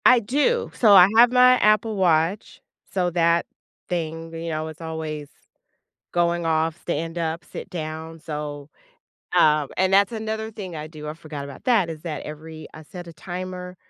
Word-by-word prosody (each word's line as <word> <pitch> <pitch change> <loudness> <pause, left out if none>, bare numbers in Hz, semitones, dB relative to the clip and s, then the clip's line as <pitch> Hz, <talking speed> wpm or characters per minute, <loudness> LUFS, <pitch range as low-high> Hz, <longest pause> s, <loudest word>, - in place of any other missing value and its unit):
I 250 - +8
do. 290 - 0
So, 215 -4 +5
I 185 -2 +9
have 240 +1 +7
my 250 0 +6
Apple 215 +1 +3
Watch. 175 0 +1 0.3
So, 180 -2 0
that 170 0 +2 0.4
thing, 165 -1 -4
you 165 0 -5
know, 155 0 -3
it's 160 +1 -10
always 160 -2 -5 0.9
going 170 0 +1
off, 160 0 +1
"Stand 165 0 -3
up, 165 0 -2
sit - - -9
down." 160 -1 -6
So, 150 -2 -6 0.7
um, 150 -2 +4
and 190 0 +2
that's 200 +2 +4
another 220 0 -4
thing 190 -6 -7
I 155 0 -5
do, 150 -1 -9
I 150 - -5
forgot 155 -3 -8
about 140 -1 -11
that, 225 -9 +3
is 160 -2 -7
that 155 -4 -5
every 155 +1 -9
I 160 - -10
set 175 +2 -10
a 170 - -10
timer 180 +2 -7
165 Hz, 175 wpm, -23 LUFS, 155-190 Hz, 0.9 s, I